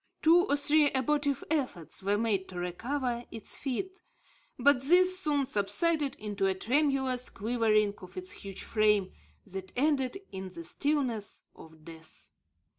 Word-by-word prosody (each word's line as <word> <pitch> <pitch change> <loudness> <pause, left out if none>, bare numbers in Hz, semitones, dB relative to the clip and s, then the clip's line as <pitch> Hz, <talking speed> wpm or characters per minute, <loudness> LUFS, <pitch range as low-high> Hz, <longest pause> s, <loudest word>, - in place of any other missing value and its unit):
Two 345 +4 +6
or - - +4
three 290 +1 +4
abortive 280 +1 +1
efforts 255 - -1
were 200 +2 +1
made 205 -4 0
to 185 - -8
recover 240 +8 -2
its 225 - -7
feet, 370 +8 -4 0.6
but 270 0 +4
these 365 +6 +4
soon 290 -5 +1
subsided 280 - +1
into 205 -2 -2
a 190 - +1
tremulous 265 +2 +1
quivering 215 -1 +1
of 185 0 -12
its 185 0 -5
huge 195 -1 -7
frame, 210 -3 +2 0.3
that 190 0 -6
ended 275 +2 +1
in 190 -1 -6
the 170 -2 -8
stillness 250 - -1
of 160 -1 -15
death. 160 -1 -8
240 Hz, 140 wpm, -30 LUFS, 195-290 Hz, 0.6 s, Two